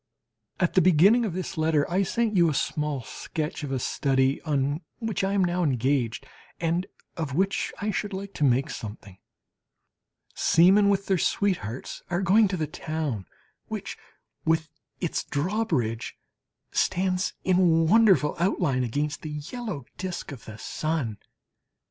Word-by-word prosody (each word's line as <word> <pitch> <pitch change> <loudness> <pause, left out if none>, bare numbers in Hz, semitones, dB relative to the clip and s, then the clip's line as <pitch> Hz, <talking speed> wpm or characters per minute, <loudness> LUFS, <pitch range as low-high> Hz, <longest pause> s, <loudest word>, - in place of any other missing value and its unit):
At 180 - +1
the 185 - +5
beginning 185 +8 +5
of 195 - -2
this 185 -1 -4
letter 155 -2 +2
I 185 +3 +1
send 220 +3 0
you 170 -3 +5
a 150 - -1
small 150 -2 -1
sketch 155 +6 -5
of 140 - -4
a 135 - 0
study 135 +1 +1
on 145 0 0 0.2
which 220 -5 -2
I 195 +1 +1
am 200 -2 +3
now 175 0 +1
engaged, 130 -4 0 0.3
and 170 +2 0 0.3
of 150 -5 -3
which 195 +3 +1
I 210 +1 -1
should 205 0 -2
like 200 +1 -6
to - - -2
make 135 +2 +3
something. 105 -3 -8 1.1
Seamen 195 +5 +5
with 200 0 +1
their 190 -3 +1
sweethearts 165 - -1
are 175 +2 0
going 205 +4 +5
to 185 -1 -2
the 155 - 0
town, 150 - -4 0.4
which, - - -5 0.5
with 160 -1 +1 0.3
its 175 - -1
drawbridge, 145 - -1 0.5
stands 185 +1 +1
in 175 -3 +4
wonderful 200 -6 +5
outline 170 -8 +1
against 145 +5 -2
the 155 - -6 0.2
yellow 220 - -5
disc 180 -4 -4
of 135 -5 -10
the 110 -1 -9
sun. 135 -5 -2
165 Hz, 150 wpm, -26 LUFS, 140-190 Hz, 1.1 s, the